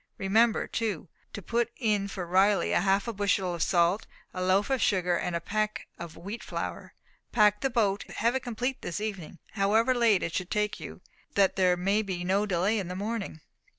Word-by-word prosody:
Remember, 220 +4 +2
too, 205 -8 -3 0.2
to 205 - -8
put 235 +4 0
in 210 -5 +1
for 190 -2 -5
Riley 190 +3 +3
a - - +3
half 195 +1 +2
bushel 195 -2 +1
of 170 - -5
salt, 180 +3 +2 0.3
a 185 - -4
loaf 190 +6 +2
of 265 -3 +1
sugar, 180 -2 +2
and 175 0 -2
a - - 0
peck 215 +5 -2
of 170 -2 -8
wheat 200 +7 -7
flour. - - -5 0.4
Pack 210 -2 +4
the 270 - +1
boat, 205 -5 +1
and - - -11
have 235 +3 +1
it 265 - 0
complete 245 +2 -3
this 175 - -4
evening, 195 -6 -5
however 220 +5 +2
late 230 -6 +3
it 165 - -3
should 185 0 -2
take 210 0 -1
you, - - -9 0.3
that 195 -2 +3
there 180 -2 +3
may 195 +4 +1
be 185 -4 -4
no 195 +3 +1
delay 195 +4 +1
in 190 - -4
the 180 - -5
morning." 205 -5 -4
200 Hz, 200 wpm, -28 LUFS, 185-220 Hz, 0.4 s, Pack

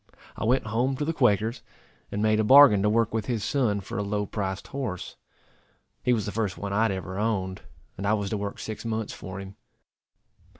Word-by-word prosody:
I - - -3
went 125 +2 +2
home 120 +5 0
to 145 - -1
the 165 - -1
Quaker's, 115 -3 +2 0.5
and 105 +1 -1
made 110 0 +3
a - - +3
bargain 130 -3 +8
to 105 - +3
work 115 0 +2
with 110 -2 -2
his 115 -4 -1
son 110 -6 +1
for 95 - -5
a - - 0
low 105 0 -1
priced 95 -1 -4
horse. 125 -10 -4 0.9
He 125 - +1
was 110 -4 +1
the 105 - -3
first 105 -3 -2
one 100 -1 -4
I 105 - +2
had 115 -2 +3
ever 95 0 -4
owned, 95 -4 -1 0.4
and 100 - -2
I 105 - +3
was 100 -2 -3
to 110 - 0
work 100 0 -4
six 110 -1 -6
months 110 -2 -3
for 95 +1 -7
him. 95 0 -9
105 Hz, 215 wpm, -26 LUFS, 100-115 Hz, 0.9 s, bargain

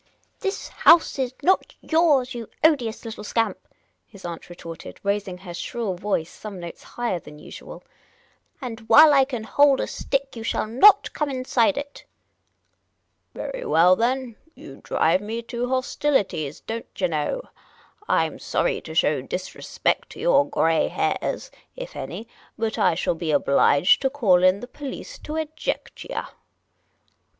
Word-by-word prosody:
This 390 -1 -3
house 330 -4 +5
is 255 -2 0
not 375 +5 +2
yours, 300 -6 +2
you 235 -2 -7
odious 250 -8 +2
little 220 -2 -7
scamp," 225 +2 -1 0.5
his 200 -4 -14
aunt 170 0 -7
retorted, 165 -2 -10
raising 200 -2 -1
her 180 -1 -9
shrill 220 +3 -3
voice 180 -3 -2
some 205 -3 -9
notes 170 -1 -8
higher 240 -7 -3
than 150 -2 -13
usual; - - -11 0.4
" - - -39
and 225 -2 -7
' - - -7
ile 305 0 +9
I 270 -1 +5
can 250 -5 -5
hold 285 +4 +4
a - - 0
stick 275 -1 -3
you 230 - -7
shall 225 - -1
not 320 - +5
come 300 -2 -1
inside 255 0 +1
it." 285 0 -7 0.6
" - - -49
Very - - -5
well, 180 - +5
then; 245 +1 -1 0.2
you 135 - -12
drive 165 +4 +2
me 225 +3 -5
to 240 +1 -4
hostilities, 255 - -1
don't 230 +1 -6
yah 190 - +2
know. 160 - -1 0.7
I - - +3
'm - - -7
sorry - - -1
to - - -9
show - - +2
disrespect - - -2
to - - -12
your 290 - +3
grey 165 - +2
hairs - - -2
— - - -42
if - - -8
any 225 - -6 0.2
— - - -31
but 225 -1 -2
I 175 -3 +3
shall 175 - 0
be 165 -1 -5
obliged 145 +2 +4
to 270 - +2
call 215 -11 +3
in 185 +2 +4
the 245 - -7
police 290 - -8
to 305 - -6
eject 315 -1 -4
yah." - - -5
235 Hz, 165 wpm, -24 LUFS, 185-280 Hz, 0.7 s, ile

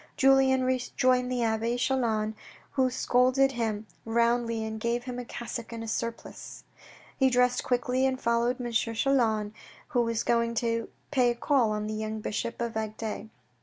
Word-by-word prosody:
Julien 265 -1 +5
rejoined 255 0 +1
the 245 -1 0
abbe 225 +1 0
Chelan, 230 -5 0 0.4
who 260 -2 +2
scolded 255 +2 +3
him 220 -4 -2 0.2
roundly 235 0 +1
and 220 0 -5
gave 235 +2 -1
him 250 -1 -5
a 245 - -6
cassock 235 -1 -6
and 230 -1 -5
a - - -6
surplice. 230 +1 -5 0.5
He 265 -1 +3
dressed 250 0 +2
quickly 250 +1 +1
and 260 -1 -2
followed 235 +2 +1
M. 240 -1 -4
Chelan, 225 -2 +1 0.4
who 250 -5 +2
was 230 -1 0
going 235 0 +1
to 230 0 -1 0.2
pay 255 -4 +3
a 240 - 0
call 250 -2 +2
on 210 0 -2
the 215 - -3
young 215 0 -3
bishop 215 +2 -3
of 235 -1 -3
Agde. 220 0 -4
235 Hz, 165 wpm, -28 LUFS, 225-255 Hz, 0.5 s, Julien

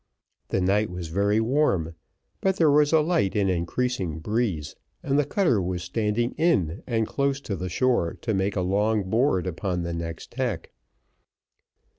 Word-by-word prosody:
The 95 - 0
night 100 +3 +2
was 90 -2 -6
very 100 +5 +2
warm, 110 - +1 0.5
but 190 -1 +2
there 160 -5 +4
was 145 0 +4
a 160 -1 +5
light 155 - +1
and 100 -2 +2
increasing 90 0 -1
breeze, 90 -5 -2 0.3
and 140 +1 +1
the 145 - +2
cutter 145 - +2
was 90 -1 -3
standing 105 +5 -1
in 100 - +1
and 115 -2 +1
close 140 +3 -1
to 100 - -4
the 90 +1 -4
shore 120 -6 +1
to 110 - -1
make 95 +1 0
a 95 - 0
long 105 +3 +1
board 115 -6 +2
upon 90 0 -2
next 85 -1 -5
tack. 120 -9 -3
105 Hz, 160 wpm, -25 LUFS, 90-130 Hz, 0.5 s, a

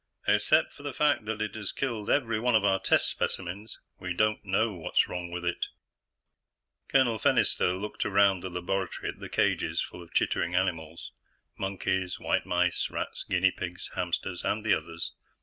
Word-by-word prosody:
"Except - - +4
for - - -14
the 145 -2 -5
fact 145 -7 +2
that 110 0 -2
it 105 -2 -4
has 105 -3 -4
killed 115 -6 -3
every 115 -6 +2
one 120 +1 +2
of 105 -2 +4
our 95 -1 +3
test 95 - +3
specimens, 95 +4 -3 0.2
we 90 -1 -3
don't 110 +2 +2
know 105 +3 +1
what's 85 -4 +1
wrong 90 -1 -4
with 90 0 -5
it." 85 - -1 1.2
Colonel 125 -5 +3
Fennister 90 -1 +2
looked 105 +1 -3
around 100 -1 +4
the 95 - -5
laboratory 90 +1 -2
at - - -7
the - - -7
cages - - +1
full 90 - -4
of 85 - -13
chittering 85 +1 +1
animals 85 -3 -1 0.4
monkeys, 95 -1 -1
white - - 0
mice, 90 0 +1
rats, - - -4
guinea 95 0 +4
pigs, 90 0 -6
hamsters, 90 0 -2
and 110 0 -1
the 110 - +5
others. 85 0 -3
95 Hz, 170 wpm, -29 LUFS, 90-110 Hz, 1.2 s, the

